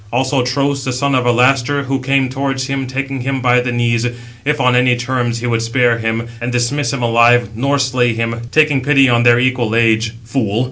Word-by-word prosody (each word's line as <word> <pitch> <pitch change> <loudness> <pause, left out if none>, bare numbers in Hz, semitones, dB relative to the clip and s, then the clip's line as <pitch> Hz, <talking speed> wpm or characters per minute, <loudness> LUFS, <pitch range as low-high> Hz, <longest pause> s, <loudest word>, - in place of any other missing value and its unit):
Also 130 +2 0
Tros, 140 +2 -1
the 130 - -3
son 140 +3 -1
of 130 -1 +1
Alastor, 130 +3 +2
who 135 0 -2
came 135 0 0
towards 135 0 -3
him, 135 -1 -3
taking 135 0 -4
him 135 +1 -2
by 125 -1 +2
the 125 0 -3
knees, 120 -1 0 0.4
if 150 +1 -1
on 125 -2 +2
any 125 0 +3
terms 120 -1 -2
he - - -4
would 115 -2 0
spare 115 0 +1
him, 115 +1 -2
and 120 +1 -3
dismiss 125 +2 -1
him 135 -3 -3
alive, 120 +1 +3
nor 140 +5 0
slay 130 -3 +1
him, 115 0 -3
taking 155 -3 +2
pity 135 0 +3
on 120 -1 +2
their 120 0 +5
equal 125 -3 0
age: 115 -1 +1
fool! 115 -3 -2
125 Hz, 205 wpm, -16 LUFS, 120-135 Hz, 0.4 s, their